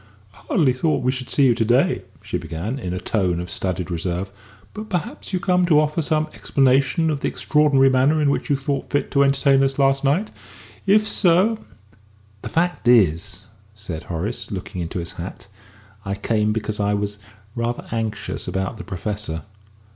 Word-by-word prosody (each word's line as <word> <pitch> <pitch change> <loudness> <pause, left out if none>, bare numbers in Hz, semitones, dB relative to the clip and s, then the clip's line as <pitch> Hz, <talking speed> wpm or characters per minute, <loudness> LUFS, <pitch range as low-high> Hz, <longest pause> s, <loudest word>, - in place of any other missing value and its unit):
"I - - -20
hardly 140 -7 +3
thought 130 0 0
we 130 - +2
should 130 -1 -6
see 140 - +4
you 125 - +5
to 115 - 0
day," 120 +4 +2 0.2
she - - -3
began, 100 - -4
in 90 -8 -4
a 90 - -3
tone 90 -6 0
of 90 +1 -5
studied 90 -1 -2
reserve; 90 +3 -3 0.4
"but 215 0 -7
perhaps 180 0 -4
you 185 - 0
came 180 0 +2
to 155 -3 +5
offer 150 +2 +1
some 155 0 +1
explanation 135 +7 +2
of 145 - -2
the - - -1
extraordinary 145 -3 +3
manner 135 +4 +3
in 145 -2 +3
which - - -2
you 145 - +3
thought 140 0 -3
fit 145 - -1
to 140 - +3
entertain 140 0 +4
us 135 0 +1
last 135 0 +3
night? 155 +10 +1 0.6
If 215 +2 +4
so 195 +5 +3 0.4
" 105 0 -31
"The - - -6
fact 170 -5 0
is," 95 -10 +3 0.3
said 95 -7 -6
Horace, 105 +7 -4
looking 95 -3 -5
into 85 +2 -4
his 85 -1 -4
hat, 90 +2 -8 0.6
"I 100 -2 -3
came 105 +1 0
because 105 -1 -2
I 105 0 +1
was 105 0 -3 0.3
rather 120 0 -3
anxious 110 -2 -3
about 95 +4 -2
the 110 - -7
Professor. 100 -3 -4
120 Hz, 185 wpm, -22 LUFS, 100-145 Hz, 0.6 s, you